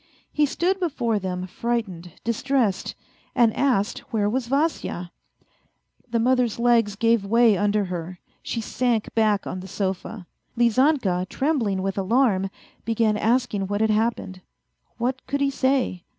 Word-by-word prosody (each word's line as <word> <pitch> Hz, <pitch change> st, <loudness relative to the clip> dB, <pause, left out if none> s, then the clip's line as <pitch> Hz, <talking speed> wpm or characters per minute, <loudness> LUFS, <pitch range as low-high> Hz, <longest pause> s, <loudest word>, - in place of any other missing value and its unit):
He 300 Hz, -1 st, +3 dB
stood 370 Hz, +7 st, 0 dB
before 250 Hz, -, 0 dB
them 180 Hz, -1 st, -4 dB
frightened, 185 Hz, -5 st, -3 dB
distressed, 230 Hz, -3 st, 0 dB, 0.4 s
and 235 Hz, -3 st, +4 dB
asked 240 Hz, -6 st, +1 dB
where 210 Hz, -3 st, +1 dB
was 240 Hz, +3 st, -1 dB
Vasya? 275 Hz, -, -1 dB, 1.0 s
The 235 Hz, -, 0 dB
mother's 250 Hz, -1 st, +2 dB
legs 235 Hz, -3 st, +3 dB
gave 230 Hz, 0 st, +2 dB
way 230 Hz, +1 st, +4 dB
under 205 Hz, +1 st, +1 dB
her; 180 Hz, 0 st, -5 dB, 0.2 s
she 230 Hz, -, -3 dB
sank 235 Hz, -1 st, -1 dB
back 215 Hz, -3 st, +2 dB
on 185 Hz, -, -4 dB
the 185 Hz, -, -8 dB
sofa. 190 Hz, +1 st, -4 dB, 0.3 s
Lizanka, 235 Hz, -, +2 dB
trembling 235 Hz, -10 st, 0 dB
with 195 Hz, 0 st, -2 dB
alarm, 195 Hz, -2 st, +2 dB, 0.3 s
began 225 Hz, -1 st, +1 dB
asking 220 Hz, -3 st, 0 dB
what 205 Hz, +1 st, -2 dB
had 220 Hz, 0 st, +3 dB
happened. 215 Hz, -4 st, -1 dB, 0.6 s
What 250 Hz, +2 st, -2 dB
could 280 Hz, -, -1 dB
he 280 Hz, 0 st, +1 dB
say 260 Hz, -9 st, 0 dB
225 Hz, 135 wpm, -24 LUFS, 195-250 Hz, 1.0 s, and